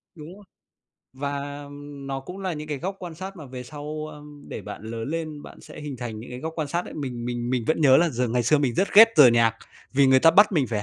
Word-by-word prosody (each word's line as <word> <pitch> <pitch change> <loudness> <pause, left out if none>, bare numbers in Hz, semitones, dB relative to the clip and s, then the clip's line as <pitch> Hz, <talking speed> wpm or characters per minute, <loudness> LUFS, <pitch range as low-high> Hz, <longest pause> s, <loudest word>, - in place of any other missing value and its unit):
Đúng 155 +3 -10
rồi. 205 - -16 0.7
Và, 140 +1 -5
ừm, 145 -1 -10
nó 135 0 -3
cũng 180 +8 -9
là 190 -2 -3
những 150 0 -7
cái 145 -2 -3
góc 190 +5 -4
quan 175 -3 -8
sát 190 +3 -8
mà 155 -4 -9
về 125 0 -8
sau, 150 +3 -6
a, 150 - -11 0.3
để - - -6
bạn - - -8
lớn 115 +3 -5
lên, 155 -2 -4
bạn - - -13
sẽ - - -12
hình 145 -3 -6
thành 115 -3 -6
những 120 - -11
cái 125 - -6
góc 160 0 -4
quan 155 -3 -2
sát 170 +4 -2
đấy. - - -10
Mình 125 -5 -5
mình 120 0 -3
mình 125 -3 0
vẫn 160 - +1
nhớ 135 -3 +7
là 170 0 +4
dường 125 -3 -1
ngày 125 0 +2
xưa 145 +6 +3
mình 130 -5 0
rất 195 - +1
ghét 225 +3 +10
giờ 145 -4 +9
nhạc, 115 -1 +3 0.4
vì 140 0 +4
người 130 0 +5
ta 165 - +7
bắt 205 +3 +5
mình 145 -6 +2
phải 110 -3 -2
145 Hz, 275 wpm, -24 LUFS, 125-160 Hz, 0.7 s, ghét